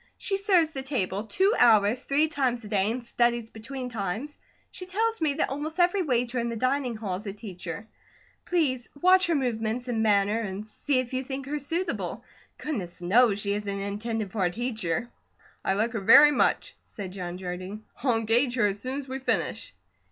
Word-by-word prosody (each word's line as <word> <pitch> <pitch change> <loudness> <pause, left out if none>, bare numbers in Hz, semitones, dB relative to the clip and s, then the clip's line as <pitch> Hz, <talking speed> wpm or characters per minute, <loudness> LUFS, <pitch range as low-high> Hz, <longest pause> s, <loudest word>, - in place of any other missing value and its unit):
She 390 - -1
serves 375 -5 +3
the 270 - -4
table 210 -7 -2
two 380 - +2
hours, 225 +1 +4
three 295 +3 +3
times 260 -6 -1
a - - -8
day, 205 -1 +1
and 240 +2 -3
studies 235 -1 0
between 250 +4 -6
times. 225 +5 -4 0.4
She 365 - -7
tells 450 +3 0
me 300 -3 +1
that 310 - 0
almost 305 +5 -4
every 355 +2 +3
waiter 250 -5 0
in 235 0 -1
the 230 - -3
dining 255 +1 0
hall 200 -4 -3
is 205 +3 -9
a 195 - -3
teacher. 195 -1 -7 0.6
Please 275 -8 0
watch 370 +3 +5
her 335 - +2
movements 240 -2 -1
and 230 -3 0
manner 205 0 +3
and 205 -1 -4
see 265 +5 -1
if 255 0 -2
you 260 +1 -1
think 265 0 -5
her 295 +2 -3
suitable. 330 +5 -3 0.3
Goodness 205 - -5
knows 205 +3 +3
she 200 0 0
isn't 200 -1 -3
intended 210 +1 -3
for 205 -3 -1
a - - +2
teacher." 225 -2 -2 0.5
"I - - +1
like 220 +4 0
her 225 - -1
very 295 +9 +8
much," 280 - +1
said 190 -3 -7
John 180 -2 -5
Jardine. 185 +3 -6 0.2
"I'll 250 -3 +2
engage 235 +3 +2
her 235 -4 +3
as 205 0 0
soon 255 +4 -3
as 280 -1 -6
we 265 +1 -4
finish." 265 - -1
235 Hz, 195 wpm, -27 LUFS, 205-280 Hz, 0.6 s, very